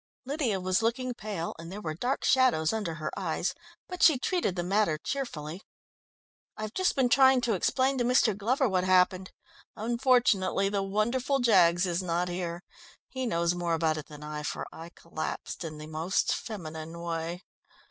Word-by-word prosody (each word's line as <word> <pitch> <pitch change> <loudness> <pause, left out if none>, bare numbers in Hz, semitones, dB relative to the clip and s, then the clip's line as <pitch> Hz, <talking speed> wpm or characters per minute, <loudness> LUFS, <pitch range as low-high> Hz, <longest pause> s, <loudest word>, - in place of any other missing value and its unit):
Lydia 265 -8 -1
was 185 +2 +1
looking 245 +2 -1
pale, 205 -7 -4
and 165 +1 -8
there 200 - -6
were 160 -7 -4
dark 245 - -2
shadows 250 -12 +3
under 205 -7 -2
her 155 -1 -4
eyes, - - -1 0.3
but 360 -2 -7
she 315 -5 +7
treated 305 - 0
the 175 - -2
matter 190 -3 +1
cheerfully. 170 - -5 1.0
"I've 215 0 -5
just 375 -1 +1
been 265 -3 +3
trying 265 +1 +6
to 240 -2 +1
explain 260 +7 +1
to - - +2
Mr. 240 -3 +3
Glover 250 +7 +1
what 185 -3 +1
happened. 185 0 +3 0.4
Unfortunately, 230 -5 +2
the 200 -1 0
wonderful 235 +8 0
Jaggs 185 -8 +4
is 175 0 -1
not 175 0 -1
here. 175 0 -4 0.5
He 260 -1 -3
knows 170 -4 +1
more 175 -1 -1
about 160 -1 +1
it 150 - -7
than 150 -1 -11
I, 150 0 -5
for 150 - -4
I 165 +1 -9
collapsed 165 0 -6
in 155 -2 -6
the 150 - -8
most 160 +5 0
feminine 165 -5 -6
way." 170 +1 -4
190 Hz, 170 wpm, -29 LUFS, 170-245 Hz, 1.0 s, she